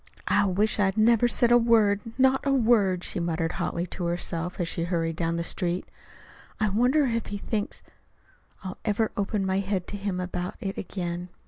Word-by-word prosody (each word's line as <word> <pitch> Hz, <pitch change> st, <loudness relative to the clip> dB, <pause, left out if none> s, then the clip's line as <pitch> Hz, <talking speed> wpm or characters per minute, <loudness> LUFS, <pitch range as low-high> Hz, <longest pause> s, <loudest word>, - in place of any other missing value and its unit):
"I -, -, +3 dB
wish 205 Hz, +4 st, +1 dB
I'd 195 Hz, 0 st, +2 dB
never 230 Hz, +2 st, +5 dB
said 240 Hz, 0 st, +2 dB
a 240 Hz, -, +7 dB
word 220 Hz, -4 st, +3 dB, 0.2 s
not 265 Hz, 0 st, +3 dB
a 280 Hz, -, +1 dB
word," 220 Hz, -8 st, +3 dB
she -, -, -3 dB
muttered 165 Hz, -1 st, -1 dB
hotly 170 Hz, 0 st, -2 dB
to 180 Hz, 0 st, -5 dB
herself 175 Hz, +1 st, -2 dB
as 175 Hz, -, 0 dB
she 165 Hz, 0 st, -2 dB
hurried 165 Hz, -2 st, -1 dB
down 165 Hz, 0 st, -1 dB
the 170 Hz, -, -1 dB
street. 175 Hz, +1 st, -2 dB, 0.7 s
"I 215 Hz, -, +2 dB
wonder 250 Hz, +8 st, +3 dB
if 230 Hz, -3 st, -1 dB
he 205 Hz, -, -4 dB
thinks 205 Hz, 0 st, -3 dB, 0.8 s
I'll 185 Hz, -1 st, -6 dB
ever 215 Hz, +1 st, 0 dB
open 200 Hz, 0 st, -1 dB
my 190 Hz, 0 st, +1 dB
head 195 Hz, -2 st, -2 dB
to 205 Hz, -, -5 dB
him 200 Hz, -2 st, -3 dB
about 180 Hz, 0 st, -4 dB
it 195 Hz, 0 st, -4 dB
again. 175 Hz, -1 st, -4 dB
195 Hz, 190 wpm, -26 LUFS, 175-220 Hz, 0.8 s, a